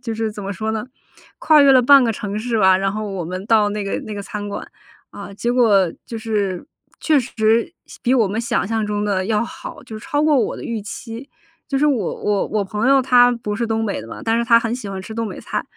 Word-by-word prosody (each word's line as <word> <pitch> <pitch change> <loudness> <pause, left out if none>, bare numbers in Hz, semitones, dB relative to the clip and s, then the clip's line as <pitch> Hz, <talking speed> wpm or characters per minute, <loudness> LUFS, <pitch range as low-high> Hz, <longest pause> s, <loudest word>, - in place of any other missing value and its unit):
就 230 -2 -4
是 220 0 -2
怎 210 -1 -8
么 200 +1 -4
说 220 +3 -3
呢， 220 +1 -3 0.5
跨 310 -2 +5
越 275 -1 +6
了 255 -1 +6
半 275 +1 +7
个 225 - +1
城 205 0 -4
市 230 0 -1
吧， 190 -2 +5
然 195 0 0
后 215 -1 -4
我 185 -4 -4
们 185 +3 -5
到 215 -3 +4
那 210 0 -3
个 195 - -3
那 215 - -7
个 200 - -5
餐 205 0 -6
馆。 200 - -6 0.4
啊， - - -9
结 240 +4 -1
果 205 -8 +3
就 230 - -6
是 210 -1 -2 0.3
确 305 -4 +2
实， 230 +2 +1
想 - - -14
比 255 +1 +2
我 225 -5 +3
们 210 +4 -2
想 235 -3 -1
象 220 -1 -1
中 205 0 -2
地 190 -2 -1
要 220 0 +1
好， - - -9
就 220 -1 -9
超 290 +7 -1
过 305 -1 +4
我 - - -1
的 - - -8
预 230 -2 -3
期。 230 +5 -8 0.4
就 275 - 0
是 300 - +3
我 240 - 0
我 205 -1 0
我 210 -2 -1
朋 210 +6 -1
友 275 0 +5
他 245 -1 +5
不 230 -4 -3
是 230 +2 -2
东 225 0 -1
北 200 - -2
的 110 - -10
嘛， - - -9
但 225 +1 +1
是 235 - 0
他 230 0 +6
很 230 0 -2
喜 220 -5 -6
欢 195 -1 -5
吃 220 - -9
东 230 -1 -2
北 - - -8
菜。 - - -4
220 Hz, 280 characters per minute, -20 LUFS, 205-235 Hz, 0.5 s, 半